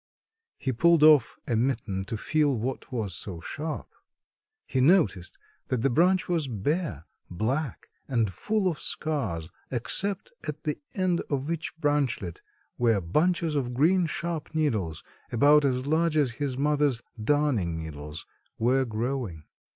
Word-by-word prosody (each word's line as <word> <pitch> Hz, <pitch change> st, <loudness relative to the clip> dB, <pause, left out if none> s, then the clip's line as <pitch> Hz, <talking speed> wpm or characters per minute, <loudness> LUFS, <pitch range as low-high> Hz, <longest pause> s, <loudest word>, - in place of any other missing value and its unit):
He 130 Hz, -, -2 dB
pulled 165 Hz, +6 st, +4 dB
off 150 Hz, -6 st, +6 dB
a 120 Hz, -, +1 dB
mitten 110 Hz, -6 st, -1 dB
to 110 Hz, +2 st, -4 dB
feel 150 Hz, +2 st, +1 dB
what 130 Hz, +5 st, -4 dB
was 110 Hz, -7 st, -2 dB
so 90 Hz, -1 st, -5 dB
sharp. 155 Hz, -, -5 dB, 0.8 s
He 130 Hz, -, 0 dB
noticed 125 Hz, -, +3 dB, 0.3 s
that 125 Hz, -3 st, -1 dB
the 135 Hz, -, +3 dB
branch 180 Hz, +7 st, +3 dB
was 165 Hz, -5 st, 0 dB
bare, 125 Hz, -, -2 dB, 0.2 s
black 120 Hz, -, -2 dB, 0.2 s
and 115 Hz, -7 st, +1 dB
full 210 Hz, -, 0 dB
of 170 Hz, -4 st, -1 dB
scars 105 Hz, -, -2 dB, 0.2 s
except 190 Hz, -, -1 dB, 0.2 s
at -, -, -5 dB
the -, -, -2 dB, 0.2 s
end 185 Hz, -3 st, +1 dB
of 140 Hz, +2 st, -1 dB
each 160 Hz, -1 st, -4 dB
branchlet, 145 Hz, -, 0 dB, 0.4 s
where 115 Hz, -4 st, +3 dB
bunches 155 Hz, -, +1 dB
of 125 Hz, -4 st, -1 dB
green 170 Hz, +6 st, +4 dB
sharp 165 Hz, -1 st, -4 dB
needles 110 Hz, -, 0 dB, 0.3 s
about 145 Hz, +5 st, +5 dB
as 130 Hz, -2 st, +1 dB
large 160 Hz, +1 st, +2 dB
as 140 Hz, -5 st, +3 dB
his 135 Hz, +1 st, -3 dB
mother's 145 Hz, -4 st, +1 dB, 0.2 s
darning 120 Hz, -, +1 dB
needles 75 Hz, -1 st, -7 dB, 0.3 s
were 130 Hz, +3 st, +2 dB
growing. 115 Hz, -, -3 dB
135 Hz, 140 wpm, -27 LUFS, 110-155 Hz, 0.8 s, off